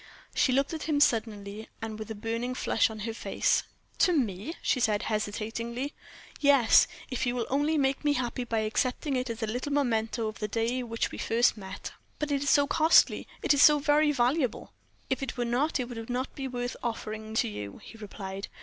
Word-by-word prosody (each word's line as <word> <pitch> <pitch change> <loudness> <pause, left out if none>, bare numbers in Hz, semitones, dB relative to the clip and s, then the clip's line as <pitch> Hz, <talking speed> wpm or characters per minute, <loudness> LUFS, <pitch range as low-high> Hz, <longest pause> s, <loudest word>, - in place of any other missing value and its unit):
She 260 - +3
looked 275 +4 +1
at 320 0 -5
him 295 -2 +2
suddenly, 215 -4 0
and 220 -1 -6
with 215 - -7
a 220 - -4
burning 230 +4 -3
flush 225 - +2
on 220 -1 -7
her 225 +2 -3
face. - - +1 0.4
"To 360 - +4
me?" 240 - -1
she 255 - +2
said, 210 -3 +1
hesitatingly. 225 +5 -3 0.5
"Yes, 280 -5 +6 0.2
if 255 0 -1
you 245 - 0
will 240 -2 -1
only 295 +3 +2
make 270 0 +1
me 295 -1 +3
happy 250 -2 -2
by 225 -2 -1
accepting 255 +6 -1
it 255 0 -1
as 230 0 -4
a - - +2
little 245 +6 -3
memento 230 -5 0
of 215 - -6
the 210 - -2
day 230 +4 -1
on 240 - -7
which 230 0 -1
we - - -7
first 235 +2 +2
met." 190 -3 -7 0.3
"But 300 -1 -2
it 280 -1 +1
is 285 - 0
so 285 +1 +5
costly 320 +3 +4 0.2
it - - +4
is 285 - +3
so 300 0 +8
very 295 +1 +3
valuable." 255 -1 0 0.4
"If 265 - 0
it 270 -2 -4
were 240 - 0
not 265 +6 0
it 250 - -2
would 225 -2 -7
not 250 +2 -2
be 270 -1 -4
worth 245 -1 -4
offering 220 -1 -4
to - - +2
you," 105 -1 -7
he - - -12
replied. 195 -2 -6
240 Hz, 210 wpm, -29 LUFS, 220-275 Hz, 0.5 s, so